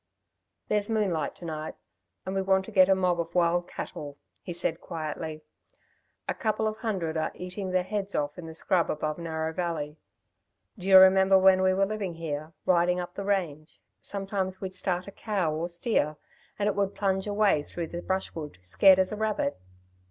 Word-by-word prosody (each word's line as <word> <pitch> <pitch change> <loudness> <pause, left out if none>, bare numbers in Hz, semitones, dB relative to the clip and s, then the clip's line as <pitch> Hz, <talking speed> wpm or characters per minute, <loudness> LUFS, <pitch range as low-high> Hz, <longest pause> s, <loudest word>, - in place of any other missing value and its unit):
"There's 210 0 +1
moonlight 190 -9 0
to 175 - -10
night, 155 -1 -5 0.5
and 190 - -3
we 195 - +1
want 190 0 +2
to 225 - -9
get 190 -2 +6
a 190 - +6
mob 180 -2 +1
of 170 +1 -4
wild 175 0 +2
cattle," 145 -1 -7 0.2
he 180 - -7
said 170 -1 -2
quietly. 155 -1 -5 0.8
"A - - 0
couple 220 -3 0
of 215 0 -3
hundred 190 -8 -2
are 155 - 0
eating 185 +2 -5
their 185 0 +1
heads 200 +1 -3
off 145 0 -1
in 165 - -7
the 160 - -9
scrub 170 +1 +1
above 155 +1 -2
Narrow 160 -1 -3
Valley. 160 -4 -3 0.8
Do 190 -4 -8
you 190 -1 +9
remember 190 0 +7
when 190 0 +6
we 185 0 +3
were 195 +1 +3
living 200 -4 -4
here, 155 -1 -4
riding 180 0 +3
up 175 0 -5
the 200 - -5
range, 170 -7 -2 0.2
sometimes 195 -1 -3
we'd 190 -1 -5
start 185 -1 -1
a - - -7
cow, 195 -6 -1
or 165 +3 -2
steer, 170 -4 0 0.4
and 205 - 0
it 210 - +2
would 200 -1 -1
plunge 190 -1 0
away 205 -6 +3
through 170 +3 -5
the 170 +2 -6
brushwood, 165 - -3
scared 185 - +6
as 190 0 +2
a - - -2
rabbit! 215 - -1
185 Hz, 190 wpm, -28 LUFS, 160-195 Hz, 0.8 s, you